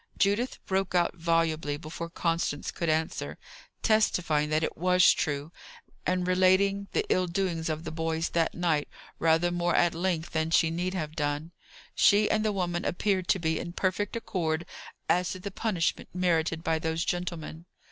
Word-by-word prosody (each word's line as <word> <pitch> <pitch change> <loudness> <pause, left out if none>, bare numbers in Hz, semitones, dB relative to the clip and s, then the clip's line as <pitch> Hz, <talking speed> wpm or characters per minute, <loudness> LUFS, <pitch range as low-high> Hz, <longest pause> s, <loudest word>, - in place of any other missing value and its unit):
Judith 205 +5 +1
broke 190 -1 -1
out 175 -1 +2
volubly 165 -3 0
before 165 +2 -7
Constance 165 -3 -1
could 170 - -2
answer, 160 +1 -1 0.5
testifying 175 -9 +2
that 155 +1 +1
it - - -2
was 180 +1 +5
true, 145 0 -2 0.6
and 180 0 0
relating 190 +2 +3
the - - +1
ill 185 0 +2
doings 170 -2 -1
of 155 0 -3
the 160 - -5
boys 160 0 -1
that 165 -1 0
night 165 -4 0 0.3
rather 165 +2 +3
more 175 0 0
at 175 -1 +3
length 170 -1 -1
than 160 0 0
she 165 0 +3
need 180 +3 -2
have 155 -3 -4
done. 150 +2 -2 0.4
She 210 +1 +5
and 215 0 +2
the 215 - +1
woman 175 -3 -1
appeared 185 0 0
to - - +3
be 160 -3 -1
in 170 - -6
perfect 190 +3 -1
accord 170 -7 -2 0.4
as 180 0 +2
to 185 - -8
the 200 +2 -6
punishment 185 -5 -1
merited 165 -2 +1
by 160 0 +1
those 160 +1 -1
gentlemen. 170 -1 -4
170 Hz, 165 wpm, -28 LUFS, 160-185 Hz, 0.6 s, was